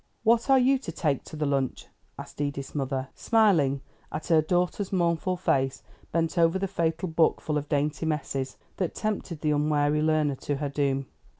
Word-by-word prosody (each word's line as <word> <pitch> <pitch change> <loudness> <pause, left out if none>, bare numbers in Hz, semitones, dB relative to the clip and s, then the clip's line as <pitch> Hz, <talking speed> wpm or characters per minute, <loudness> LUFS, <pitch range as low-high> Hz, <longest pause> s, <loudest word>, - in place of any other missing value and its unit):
"What 230 +3 +3
are 270 - +7
you 265 +1 +4
to - - -6
take 145 -5 -1
to - - -9
the 150 0 -1
lunch?" 135 -2 -1 0.3
asked - - -8
Edith's 140 -1 -3
mother, 135 -2 -2
smiling 170 - +3 0.3
at 155 - -4
her 160 -2 +6
daughter's 180 +4 0
mournful 175 0 +1
face, 135 -5 0 0.3
bent 165 +1 0
over 165 +2 +4
the 195 +1 -1
fatal 170 -1 -1
book 160 -1 +2
full 155 - -3
of 150 0 -2
dainty 150 +2 0
messes, 135 -4 -2 0.2
that 180 -4 -2
tempted 200 -7 -3
the 155 - +1
unwary 150 0 +2
learner 155 -3 +2
to 145 - -2
her 145 0 -2
doom. 140 -1 0
155 Hz, 180 wpm, -27 LUFS, 145-175 Hz, 0.3 s, are